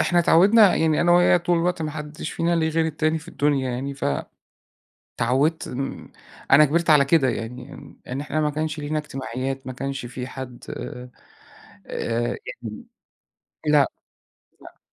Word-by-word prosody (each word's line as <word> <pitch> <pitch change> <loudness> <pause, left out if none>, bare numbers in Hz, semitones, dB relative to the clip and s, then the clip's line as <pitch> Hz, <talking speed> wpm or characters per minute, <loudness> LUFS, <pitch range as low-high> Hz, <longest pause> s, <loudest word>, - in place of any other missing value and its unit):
إحنا 175 - +2
اتعودنا 195 +5 +6
يعني 160 -1 +2
أنا 175 0 +4
وهي 175 0 +5
طول 175 0 +1
الوقت 175 0 0
ما 155 - -2
حدش 150 +1 -6
فينا 170 +1 0
له 160 -1 +1
غير 160 0 +1
التاني 155 +1 0
في 155 - -14
الدنيا 140 -3 0
يعني، 135 +3 -4
فَ 135 - -6 1.2
اتعودت 135 +7 +1 0.8
أنا 150 +2 +8
كبرت 165 +3 +1
على 145 -2 +6
كده 140 -2 +3
يعني، 115 +1 -4
يعني - - -13
إن 130 +2 -3
إحنا 150 +2 -2
ما 150 - +1
كانش 155 +1 -3
لينا 150 +1 -2
اجتماعيات، 135 -2 -5
ما 130 - -4
كانش 135 0 -4
في 125 +1 -6
حد 130 -2 -8
آآ، 125 0 -7 1.5
يعني 110 -2 -8 0.8
لأ، 150 -2 +4 0.7
لأ. - - -14
150 Hz, 155 wpm, -23 LUFS, 130-160 Hz, 1.5 s, أنا